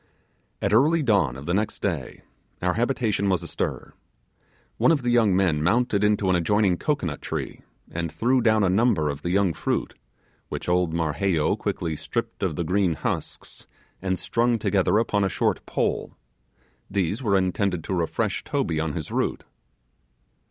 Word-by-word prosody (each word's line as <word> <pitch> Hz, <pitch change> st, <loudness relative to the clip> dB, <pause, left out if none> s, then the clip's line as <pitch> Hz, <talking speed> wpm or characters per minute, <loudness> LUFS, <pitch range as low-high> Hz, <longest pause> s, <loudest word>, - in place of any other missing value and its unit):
At 100 Hz, -, +1 dB
early 150 Hz, +8 st, +4 dB
dawn 100 Hz, -, +2 dB
of 70 Hz, -, -9 dB
the 85 Hz, -, -1 dB
next 105 Hz, +2 st, -1 dB
day, 80 Hz, -10 st, -3 dB, 0.4 s
our 90 Hz, 0 st, +1 dB
habitation 115 Hz, -4 st, 0 dB
was 90 Hz, -3 st, +1 dB
astir. 85 Hz, -, -4 dB, 0.8 s
One -, -, +4 dB
of 145 Hz, -6 st, +1 dB
the 120 Hz, -, +1 dB
young 110 Hz, -6 st, +4 dB
men 90 Hz, -6 st, +2 dB
mounted 105 Hz, +3 st, +2 dB
into 105 Hz, -1 st, +2 dB
an 95 Hz, -, +3 dB
adjoining 95 Hz, +2 st, +2 dB
cocoanut 90 Hz, -, -2 dB
tree, -, -, -5 dB, 0.3 s
and 85 Hz, -1 st, -3 dB
threw 125 Hz, +10 st, +2 dB
down 110 Hz, -2 st, +3 dB
a -, -, +3 dB
number 95 Hz, -6 st, +2 dB
of 70 Hz, 0 st, -8 dB
the 85 Hz, -, -3 dB
young 95 Hz, -1 st, +2 dB
fruit, -, -, -2 dB, 0.6 s
which -, -, -5 dB
old 90 Hz, -1 st, +2 dB
Marheyo 80 Hz, +1 st, +1 dB
quickly 80 Hz, -2 st, -3 dB
stripped 115 Hz, +8 st, -4 dB
of 90 Hz, -6 st, -1 dB
the 85 Hz, -, -1 dB
green 90 Hz, 0 st, +1 dB
husks, -, -, -5 dB, 0.3 s
and 95 Hz, -1 st, -1 dB
strung 115 Hz, +6 st, +1 dB
together 100 Hz, -1 st, +2 dB
upon 105 Hz, -3 st, +1 dB
a 95 Hz, -, +2 dB
short -, -, 0 dB
pole. -, -, -2 dB, 0.7 s
These 100 Hz, +4 st, -1 dB
were 100 Hz, -6 st, +2 dB
intended 95 Hz, -2 st, 0 dB
to -, -, -3 dB
refresh 85 Hz, -3 st, -1 dB
Toby 80 Hz, -2 st, -1 dB
on 80 Hz, -1 st, -1 dB
his 80 Hz, -1 st, -5 dB
route. -, -, -1 dB
95 Hz, 165 wpm, -25 LUFS, 85-110 Hz, 0.8 s, early